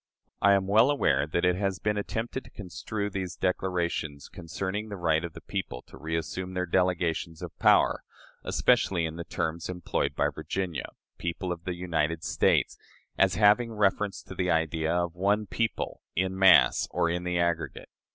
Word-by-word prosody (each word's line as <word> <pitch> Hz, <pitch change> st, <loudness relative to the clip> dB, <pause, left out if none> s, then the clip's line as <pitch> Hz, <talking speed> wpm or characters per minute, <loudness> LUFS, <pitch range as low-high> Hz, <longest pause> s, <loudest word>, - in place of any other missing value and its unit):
I 100 Hz, +1 st, +6 dB
am 100 Hz, -1 st, +2 dB
well 110 Hz, +7 st, +5 dB
aware 75 Hz, -, +2 dB
that 85 Hz, +3 st, 0 dB
it 90 Hz, 0 st, +3 dB
has 95 Hz, -1 st, -1 dB
been 105 Hz, +1 st, -1 dB
attempted 115 Hz, +5 st, -3 dB
to -, -, -13 dB
construe 100 Hz, +2 st, -5 dB
these 95 Hz, -3 st, -4 dB
declarations 85 Hz, -6 st, -2 dB
concerning 100 Hz, +6 st, -4 dB
the 100 Hz, -, -5 dB
right 80 Hz, -2 st, +1 dB
of 85 Hz, -2 st, -5 dB
the -, -, -10 dB
people 60 Hz, -, -5 dB
to -, -, -15 dB
reassume 80 Hz, +4 st, -4 dB
their 90 Hz, 0 st, 0 dB
delegations 85 Hz, -2 st, 0 dB
of -, -, -7 dB
power -, -, +4 dB, 0.4 s
especially 85 Hz, -3 st, +2 dB
in 80 Hz, 0 st, -5 dB
the 85 Hz, -, -4 dB
terms 80 Hz, 0 st, -3 dB
employed 85 Hz, -5 st, -2 dB
by -, -, +2 dB
Virginia, 90 Hz, -8 st, -4 dB, 0.3 s
"people 90 Hz, +2 st, -3 dB
of 85 Hz, -1 st, -6 dB
the 90 Hz, -2 st, -2 dB
United 80 Hz, -2 st, -1 dB
States" -, -, +1 dB, 0.4 s
as -, -, +3 dB
having 110 Hz, +3 st, +4 dB
reference 105 Hz, -2 st, 0 dB
to 95 Hz, -, -10 dB
the 90 Hz, -1 st, -1 dB
idea 80 Hz, -1 st, +1 dB
of 85 Hz, -1 st, 0 dB
one 100 Hz, +4 st, +1 dB
people, 115 Hz, +4 st, -2 dB
in 95 Hz, +2 st, 0 dB
mass, 95 Hz, 0 st, +6 dB
or -, -, +1 dB
"in 90 Hz, +1 st, -1 dB
the 90 Hz, 0 st, -1 dB
aggregate." 85 Hz, -3 st, -1 dB
90 Hz, 170 wpm, -28 LUFS, 80-95 Hz, 0.4 s, I